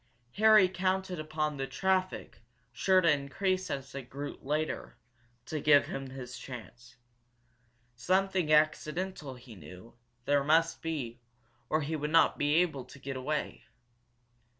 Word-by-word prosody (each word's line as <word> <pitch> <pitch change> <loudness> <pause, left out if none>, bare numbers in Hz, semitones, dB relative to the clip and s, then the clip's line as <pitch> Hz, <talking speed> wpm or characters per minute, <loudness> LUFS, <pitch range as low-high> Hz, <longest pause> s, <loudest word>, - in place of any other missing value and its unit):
Harry 215 -2 +7
counted 185 -1 -1
upon 155 -1 -2
the 135 0 -3
traffic, 190 +2 -1 0.3
sure 190 -1 +3
to 170 -3 +4
increase 185 +7 -1
as 135 -1 -5
it 135 -2 -7
grew 145 +2 -6
later, 150 -2 -3 0.5
to 155 - -3
give 145 0 +5
him 135 -1 -6
his 130 -1 -8
chance. 120 -1 -10 1.0
Something 185 +5 +1
accidental, 155 0 +1
he 125 -1 -13
knew, 95 +3 -13 0.3
there 145 -1 +3
must 165 +3 +2
be, 135 -8 -4 0.5
or 155 - +1
he 155 +2 -2
would 150 0 -2
not 165 +1 +4
be 145 +1 +2
able 160 -6 +1
to - - -14
get 135 0 -6
away. 145 +4 -3
150 Hz, 135 wpm, -30 LUFS, 135-180 Hz, 1.0 s, Harry